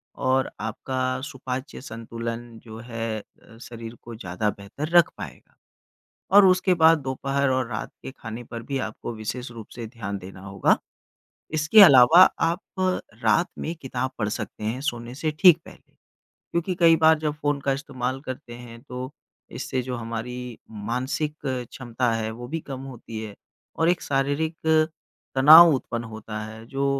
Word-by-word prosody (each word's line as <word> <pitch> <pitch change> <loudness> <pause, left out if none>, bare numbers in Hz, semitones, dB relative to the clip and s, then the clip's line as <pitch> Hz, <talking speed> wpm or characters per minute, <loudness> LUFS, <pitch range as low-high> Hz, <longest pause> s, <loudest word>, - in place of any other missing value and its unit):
और 130 0 +1
आपका 130 +4 -2
सुपाच्य 130 -1 -6
संतुलन 115 -1 -6 0.2
जो 110 -1 -10
है 115 -2 -3 0.4
शरीर 115 -1 -9
को 120 -1 -9
ज़्यादा 105 0 -2
बेहतर 105 +10 -6
रख 170 - +6
पाएगा। - - -10 0.8
और 205 -1 +9
उसके 185 0 +4
बाद 165 -1 +6
दोपहर 135 +1 -1
और 130 -2 0
रात 110 - -4
के - - -6
खाने 115 +1 -7
पर 115 0 -8
भी 135 +3 -3
आपको 110 +2 -7
विशेष 120 +4 -5
रूप 115 -3 -10
से 120 - -6
ध्यान 105 -4 -5
देना 95 0 -11
होगा। 95 0 +2 0.8
इसके 155 +7 +6
अलावा 140 +1 +9 0.3
आप 170 +3 -2 0.6
रात 115 +11 +3
में 165 - -3
किताब 130 -1 -3
पढ़ 105 -3 0
सकते 105 - -5
हैं 115 +4 -2
सोने 120 -3 -4
से 155 +3 -1
ठीक 180 -4 +8
पहले। - - -16 0.6
क्योंकि 170 +2 -1
कई 165 -1 +7
बार 160 0 +5
जब 150 -1 -2
फ़ोन 145 -1 0
का 135 0 0
इस्तेमाल 135 -2 -3
करते 125 -2 -7
हैं 120 -1 -11
तो 125 +1 -5 0.4
इससे 130 - -3
जो 125 0 -4
हमारी 120 +1 -6
मानसिक 125 +8 -3
क्षमता 125 -1 -2
है 110 -1 -2
वो 120 +2 -8
भी 165 +3 -3
कम 135 -3 -7
होती 115 -4 -8
है 105 - -8 0.4
और 165 - +2
एक 175 0 +2
शारीरिक 145 +4 0 0.8
तनाव 160 +5 +10
उत्पन्न 120 -2 -3
होता 110 -1 -7
है 110 +1 -10
जो 135 +3 -2
125 Hz, 160 wpm, -25 LUFS, 115-145 Hz, 0.8 s, तनाव